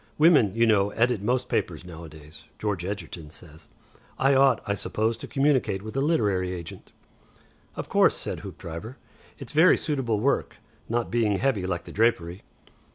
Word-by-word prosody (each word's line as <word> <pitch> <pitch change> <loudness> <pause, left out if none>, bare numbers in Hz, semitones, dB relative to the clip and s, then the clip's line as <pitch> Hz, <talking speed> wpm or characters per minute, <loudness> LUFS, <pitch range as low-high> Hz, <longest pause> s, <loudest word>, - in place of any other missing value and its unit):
Women, 150 - +5
you 115 0 +4
know, 100 -3 +3
edit 115 0 +1
most 125 +4 0
papers 90 -7 -2
nowadays, 80 -3 -12
George 105 -5 -2
Egerton 90 -5 -6
says. 80 0 -13 0.5
I 135 +1 +3
ought, 135 -3 +4
I 100 - 0
suppose, 110 +3 -1
to - - -8
communicate 135 -8 +1
with 110 +2 -8
a 135 - +1
literary 105 - +1
agent." 85 -2 -9 0.8
"Of - - -5
course," - - +3
said - - -5
Hoopdriver, 85 - -8 0.4
"it's 135 - -6
very 160 +5 +5
suitable 130 -8 -1
work. 140 +6 0 0.3
Not 120 0 -1
being 110 -4 +1
heavy 105 -7 0
like 90 -2 -2
the - - -11
drapery." 100 -5 0
105 Hz, 160 wpm, -26 LUFS, 90-125 Hz, 0.8 s, Women